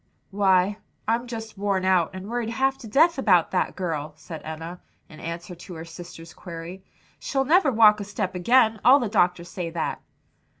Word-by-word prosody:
"Why, 195 0 +2 0.3
I'm 235 +2 0
just 225 -3 -7
worn 195 -2 0
out 185 -3 +3
and 185 +1 -7
worried 235 0 -2
half 265 +3 +1
to 230 - -10
death 310 +7 +3
about 180 -9 +3
that 185 - 0
girl," 155 -5 -3
said 160 0 -9
Enna, 165 +3 -7 0.3
in 155 - -14
answer 170 +2 -6
to 175 +1 -11
her 160 0 -8
sister's 165 -1 -11
query. 175 +1 -9 0.4
"She'll 270 -1 -1
never 315 -1 +4
walk 215 -2 +6
a - - -3
step 200 -2 -3
again 220 +4 +3
all 260 +3 +8
the 240 -6 -2
doctors 180 -4 +1
say 175 -3 -4
that." 165 -1 -3
190 Hz, 180 wpm, -24 LUFS, 170-225 Hz, 0.4 s, all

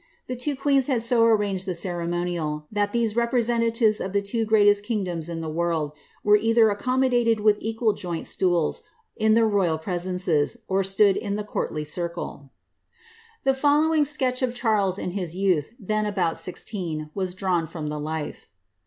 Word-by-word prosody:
The 255 - -4
two 280 +4 -2
queens 275 -1 +2
had 250 -5 +1
so 235 0 +3
arranged 205 -4 +1
the 185 - -1
ceremonial, 170 -3 -2
that 205 -1 0
these 230 -2 0
representatives 230 -2 +2
of 190 - -4
the 200 - +2
two 225 +3 -1
greatest 205 -1 +4
kingdoms 185 -7 -2
in 165 -1 -4
the 160 - -5
world 165 -2 -1 0.3
were 210 0 +6
either 225 0 +4
accommodated 245 0 +1
with 210 0 +3
equal 225 0 0
joint 175 -4 -5
stools 175 -4 0 0.3
in 220 0 +3
their 230 -1 +4
royal 190 -6 +1
presences, 180 0 -1
or 195 0 +1
stood 195 +1 +3
in 200 -2 -3
the 210 - -3
courtly 155 -6 -3
circle. 170 -3 -5 0.9
The 270 - +3
following 300 +3 +3
sketch 265 -3 0
of 250 -1 -1
Charles 210 -6 +1
in 180 - -4
his 180 -3 -4
youth, 185 -6 +1
then 215 0 -1
about 185 -5 0
sixteen, 170 -6 -4
was 185 -2 -3
drawn 180 -4 0
from 155 -2 -5
the 150 0 -4
life. 155 0 -5
205 Hz, 165 wpm, -24 LUFS, 175-230 Hz, 0.9 s, were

